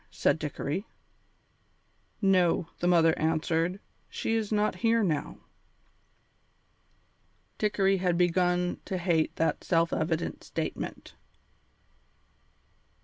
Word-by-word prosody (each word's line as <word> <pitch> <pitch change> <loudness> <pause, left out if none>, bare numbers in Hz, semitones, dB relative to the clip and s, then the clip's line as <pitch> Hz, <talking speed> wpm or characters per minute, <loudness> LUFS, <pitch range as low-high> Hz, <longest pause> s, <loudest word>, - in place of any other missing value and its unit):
said - - +1
Dickory. 150 +6 -3 1.4
"No," 180 -3 +3
the 175 - 0
mother 165 -2 +4
answered, 165 +3 0 0.3
"she 225 - -2
is 225 -2 -1
not 210 0 +1
here 230 -1 +2
now." 155 -6 -1 2.2
Dickory 195 -2 +2
had 180 -2 0
begun 180 0 +1
to 190 - -3
hate 175 -3 +1
that 165 - 0
self 165 -1 +1
evident 160 +1 -2
statement. - - -5
175 Hz, 90 wpm, -28 LUFS, 165-195 Hz, 2.2 s, mother